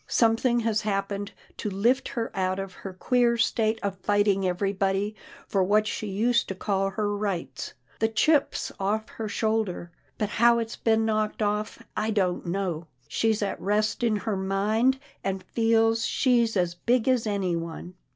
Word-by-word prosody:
Something 235 +1 +3
has 220 -1 +1
happened 200 0 -2 0.3
to 210 - -3
lift 230 +7 +1
her 230 -3 -4
out 185 -1 0
of 195 -1 -5
her 195 - -8
queer 235 +5 +2
state 225 -1 +1
of 195 -2 -3
fighting 205 -1 +2
everybody 195 +2 0 0.3
for 195 -2 +2
what 210 +3 +3
she 215 - -3
used 230 +5 +1
to 190 - -4
call 195 0 0
her 205 +1 -1
rights. 180 -10 -4 0.2
The 220 - +3
chip's 290 +6 +1
off 210 +3 -1
her 220 - -5
shoulder, 215 -6 -1 0.3
but 210 - -1
how 235 +2 +4
it's 230 -1 -3
been 225 -1 +2
knocked 215 0 0
off, 210 +1 -2
I 215 +1 0
don't 185 -5 0
know. 175 -3 -2 0.2
She's 220 -2 +1
at 200 - -3
rest 210 +5 0
in 230 -3 +2
her 210 0 -2
mind, 210 +7 +1 0.3
and 190 -1 -2
feels 225 +1 +2
she's 235 -5 +2
as 175 -1 +1
big 235 +7 +1
as 250 -4 +2
anyone. 175 -4 -2
210 Hz, 160 wpm, -26 LUFS, 195-225 Hz, 0.3 s, how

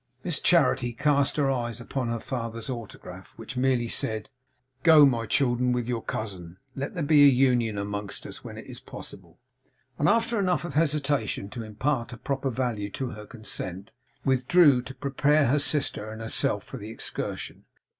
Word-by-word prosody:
Miss 175 -4 +1
Charity 135 -8 +3
cast 140 +1 +2
her 140 -2 +2
eyes 120 -2 -2
upon 125 +1 -3
her 115 0 -2
father's 115 -1 -4
autograph, 95 -6 -9
which 115 +4 -8
merely 125 -2 +1
said 110 +1 -2 0.5
'Go, 155 -2 +8
my 115 -4 +1
children, 125 0 +2
with 120 -1 -1
your 120 -2 -1
cousin. 95 -7 -6 0.2
Let 140 +7 -4
there 170 - -1
be 145 -1 +7
union 125 -5 +2
among 100 0 -3
us - - -7
when - - -8
it - - -9
is - - -9
possible;' - - -10 0.6
and 150 - +3
after 230 +1 +2
enough 180 -4 +1
of 175 - -6
hesitation 145 -9 0
to 120 - -6
impart 115 +3 -2
a - - -8
proper 135 +2 -2
value 115 -5 -2
to 130 -2 -3
her 105 -1 -9
consent, 100 -4 -5 0.3
withdrew 135 +1 +5
to 130 +2 -10
prepare 140 +3 +2
her 140 +4 +3
sister 145 -7 -1
and 110 0 -8
herself 115 0 0
for - - -9
the 105 - -8
excursion. 115 - -4
125 Hz, 170 wpm, -27 LUFS, 115-140 Hz, 0.6 s, Go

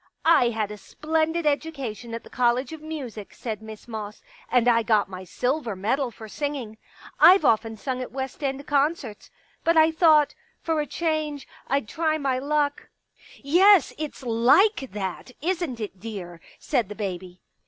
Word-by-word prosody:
" - - -35 0.2
I 240 - +3
had 220 -3 -2
a 210 - -8
splendid 320 +6 -1
education 275 -7 -2
at 230 - -7
the - - -14
College 250 +3 +1
of 315 - -9
Music," 270 -10 -7
said 220 -3 -5
Miss 220 0 -11
Moss, 215 -2 -7
" - - -25
and 245 -1 +3
I 230 -1 +5
got 215 -3 +1
my 185 0 -7
silver 245 - -2
medal 240 +8 0
for 220 -1 -11
singing. 260 -4 -4 0.4
I've 365 -3 +7
often 225 -1 +2
sung 255 +3 -3
at 255 - -6
West 265 +3 -5
End 275 0 -2
concerts. 285 -6 -1 0.3
But 335 0 +3
I 320 0 +6
thought, 315 -3 +4 0.3
for 320 -2 0
a 295 - -4
change, 310 -4 -2 0.2
I'd 275 -4 0
try 315 +4 0
my 270 -4 0
luck.. 290 +1 -1 0.2
." - - -42
" - - -17 0.2
Yes, 395 -4 +6
it's 305 -3 -5
like 260 - +3
that, 195 +5 -5
isn't 335 -6 -2
it, 200 -3 -6
dear? 185 -6 -7
" - - -24
said 240 -9 +1
the 210 - -7
baby. 185 -3 -6
255 Hz, 180 wpm, -25 LUFS, 220-305 Hz, 0.4 s, I've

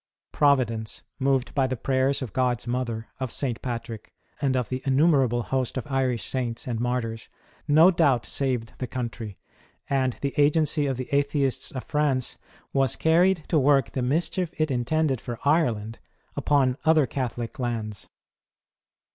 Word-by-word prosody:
Providence, 120 -6 +1 0.2
moved 135 -2 +1
by 135 -2 +2
the 130 -1 -3
prayers 135 +2 +1
of 115 -7 -7
God's 125 -3 0
Mother, 120 -2 -3
of 130 -3 -3
St. 125 -5 -1
Patrick, 115 -3 -5 0.3
and 135 -2 +1
of 125 -3 -1
the 130 - -2
innumer 140 +1 +3
able 120 0 -1
host 130 0 -2
of 130 - -3
Irish 130 -3 0
Saints 125 -2 -3
and 120 -3 -2
Martyrs, 120 -2 -2 0.4
no 160 +5 +7
doubt, 145 -9 +2
saved 125 -5 -2
the 125 - -3
country; 115 -5 -5 0.5
and 130 -3 0
the 140 -1 -1
agency 150 0 +3
of 135 -2 -1
the 130 - -4
Atheists 140 -1 +1
of 130 - -6
France 140 -4 -1 0.3
was 135 -3 +2
carried 175 +1 +3
to 160 - +3
work 140 -2 +3
the 130 - -2
mischief 165 +7 0
it 155 -2 +1
intended 135 +1 0
for 120 -2 -5
Ireland 120 -8 +1 0.4
upon 135 -3 +2
other 160 -2 +4
Catholic 125 +1 -4
lands. 110 -4 -4
130 Hz, 155 wpm, -25 LUFS, 120-145 Hz, 0.5 s, no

